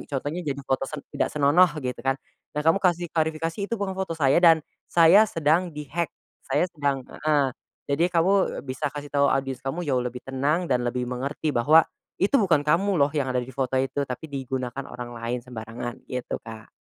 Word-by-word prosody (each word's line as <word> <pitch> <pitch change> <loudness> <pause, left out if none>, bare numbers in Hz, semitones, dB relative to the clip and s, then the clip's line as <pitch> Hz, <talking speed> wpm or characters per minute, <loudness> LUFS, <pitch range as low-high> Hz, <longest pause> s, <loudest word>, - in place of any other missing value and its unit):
contohnya 145 +5 -3
jadi 140 -2 -3
foto 135 0 -1
sen 150 -2 -7
tidak - - 0
senonoh 150 +5 +4 0.2
gitu 125 - -3
kan, 135 0 0 0.4
dan - - +1
kamu 165 +4 +4
kasih 175 -2 +2
klarifikasi, 165 +4 -1
"Itu 230 - -1
bukan 200 -2 -2
foto 190 -3 -3
saya 140 +1 +4
dan 165 -3 +6 0.2
saya 185 +6 +6
sedang 165 +3 +1
di-hack. 155 +3 -2 0.4
Saya - - +2
sedang" 140 -3 -1 0.2
heeh, 140 -4 +3 0.3
jadi 165 +5 +1
kamu 185 0 +2
bisa 130 +3 -2
kasih 145 0 -8
tahu 140 -1 +3
audience 135 -1 -1
kamu 160 +7 -3
jauh 130 -4 +1
lebih 125 0 -5
tenang 140 +6 0
dan 125 -5 +1
lebih 125 +1 -2
mengerti 135 +5 -3
bahwa, 150 +7 +5 0.3
itu 195 - +1
bukan 165 -7 +3
kamu 185 +5 +2
loh 140 0 +3
yang 145 -4 -1
ada 125 -1 0
di 130 - -11
foto 130 0 -1
itu 135 +2 0
tapi 125 +5 -5
digunakan 130 -1 -4
orang 120 -1 -7
lain 120 +1 -3
sembarangan 120 0 -7
gitu, 125 -1 -4
Kak. 110 -1 -11
145 Hz, 190 wpm, -25 LUFS, 130-165 Hz, 0.4 s, dan